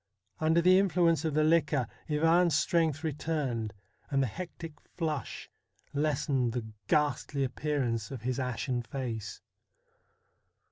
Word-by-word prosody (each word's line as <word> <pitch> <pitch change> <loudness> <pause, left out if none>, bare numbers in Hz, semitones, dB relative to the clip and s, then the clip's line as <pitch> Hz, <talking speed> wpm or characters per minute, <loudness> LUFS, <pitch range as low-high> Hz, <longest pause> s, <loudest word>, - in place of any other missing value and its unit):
Under 160 +2 +3
the 185 +1 +7
influence 170 -5 +3
of 155 -2 -1
the 155 - +4
liquor, 155 -5 +3 0.2
Ivan's 165 +2 +4
strength 160 -1 +1
returned, 140 -8 -2 0.4
and 135 -1 +2
the - - +2
hectic 165 - -7
flush 155 -6 -3 0.5
lessened 140 -4 +1
the 120 -2 -3 0.2
ghastly 145 -1 +1
appearance 130 -4 -1
of 130 -5 -7
his 130 +1 -1
ashen 125 0 -1
face. 115 -5 -5
150 Hz, 120 wpm, -30 LUFS, 125-160 Hz, 0.5 s, the